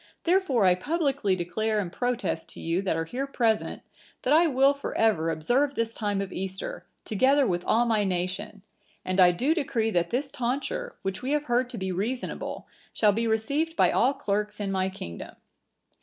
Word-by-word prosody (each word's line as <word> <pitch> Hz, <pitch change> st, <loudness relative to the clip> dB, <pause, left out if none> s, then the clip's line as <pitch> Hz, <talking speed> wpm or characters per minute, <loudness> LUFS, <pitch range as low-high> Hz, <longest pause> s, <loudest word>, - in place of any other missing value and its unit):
Therefore 335 Hz, -, +3 dB
I 180 Hz, -, +6 dB
publicly 275 Hz, -, 0 dB
declare 200 Hz, +5 st, -1 dB
and 180 Hz, -4 st, -3 dB
protest 245 Hz, -9 st, -2 dB
to -, -, -11 dB
you 165 Hz, +3 st, -1 dB
that 190 Hz, -4 st, 0 dB
are 165 Hz, -, -1 dB
here 260 Hz, +10 st, -3 dB
present, 230 Hz, -5 st, 0 dB, 0.4 s
that 260 Hz, -, +3 dB
I 330 Hz, +2 st, +6 dB
will 275 Hz, -1 st, +4 dB
for 280 Hz, -, -5 dB
ever 190 Hz, -8 st, +2 dB
observe 245 Hz, -, +1 dB
this 230 Hz, 0 st, -1 dB
time 205 Hz, -3 st, -1 dB
of 195 Hz, -, -5 dB
Easter, 190 Hz, +1 st, -5 dB, 0.2 s
together 265 Hz, +6 st, +3 dB
with 175 Hz, -5 st, -1 dB
all 235 Hz, +2 st, +3 dB
my 220 Hz, -3 st, +2 dB
nation; 190 Hz, +2 st, -3 dB, 0.4 s
and 185 Hz, +1 st, -1 dB
I 180 Hz, -1 st, +8 dB
do 255 Hz, -, +1 dB
decree 235 Hz, -8 st, 0 dB
that 175 Hz, -3 st, +1 dB
this 270 Hz, +3 st, -2 dB
tonsure, 285 Hz, -, -3 dB
which 195 Hz, 0 st, -3 dB
we 265 Hz, +3 st, -1 dB
have 300 Hz, -1 st, +1 dB
heard 245 Hz, -2 st, +1 dB
to 245 Hz, -, -6 dB
be 190 Hz, -2 st, -2 dB
reasonable, 225 Hz, +8 st, -3 dB, 0.3 s
shall 210 Hz, -2 st, +3 dB
be 230 Hz, +3 st, -1 dB
received 280 Hz, +9 st, 0 dB
by -, -, +4 dB
all 265 Hz, +4 st, +3 dB
clerks 210 Hz, +1 st, -2 dB
in 200 Hz, -1 st, -2 dB
my 190 Hz, 0 st, 0 dB
kingdom." 85 Hz, -, -8 dB
220 Hz, 185 wpm, -27 LUFS, 190-270 Hz, 0.4 s, I